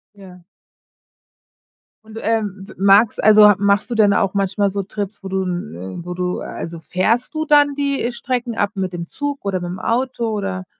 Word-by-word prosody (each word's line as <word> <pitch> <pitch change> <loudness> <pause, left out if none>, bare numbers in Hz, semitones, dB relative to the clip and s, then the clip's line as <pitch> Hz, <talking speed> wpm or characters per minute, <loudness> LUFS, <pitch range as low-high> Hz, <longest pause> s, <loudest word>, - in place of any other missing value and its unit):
Ja. 185 -3 -14 1.6
Und, 220 0 -11
ähm, 210 -4 -2
m - - -12
magst 200 +3 +4
also, 210 -1 +8
machst 200 +3 +1
du 240 - -2
denn 210 -2 +4
auch 195 -2 +1
manchmal 200 0 0
so 200 +1 -3
Trips, 200 0 -6
wo - - -5
du 190 0 -1
n 95 - -5
wo 180 - -5
du 180 0 -2
also, 165 0 -6
fährst 215 - 0
du 315 0 -2
dann 290 -1 +4
die 280 -4 -1
Strecken 240 -1 -3
ab 205 0 0
mit 185 -2 -3
dem 170 -1 -6
Zug 285 -3 -4
oder 195 -2 -1
mit'm 175 +1 -5
Auto 240 +1 -1
oder 195 -3 -3
200 Hz, 180 wpm, -19 LUFS, 185-230 Hz, 1.6 s, also